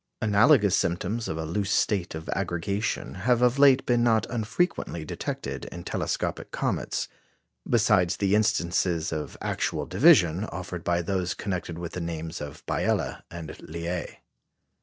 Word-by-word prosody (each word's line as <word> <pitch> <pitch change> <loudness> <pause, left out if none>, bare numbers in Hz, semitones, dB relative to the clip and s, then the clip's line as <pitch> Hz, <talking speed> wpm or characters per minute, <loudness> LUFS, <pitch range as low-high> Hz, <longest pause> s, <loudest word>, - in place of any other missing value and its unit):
Analogous 105 - +5
symptoms 95 +6 -1
of 80 - -3
a 80 - -3
loose 95 +5 -2
state 95 -4 +1
of 80 0 -7
aggregation 100 +6 -2 0.2
have 125 0 +4
of 125 +2 +3
late 135 -2 +6
been 120 -1 +2
not 110 -3 +3
unfrequently 115 - -1
detected - - -4
in 85 - -8
telescopic - - -2
comets, - - -2 0.6
besides 90 -2 +3
the 100 -1 +1
instances 85 -5 +1
of 75 -1 -5
actual - - -1
division 95 - +5
offered 90 -2 -6
by 85 0 +1
those 90 0 -1
connected 90 -4 -4
with 85 -1 -5
the 90 - -4
names 80 -1 -5
of 75 -1 -8
Biela - - -1
and 85 -2 -7
Liais. 85 +2 -5
90 Hz, 140 wpm, -27 LUFS, 85-110 Hz, 0.6 s, late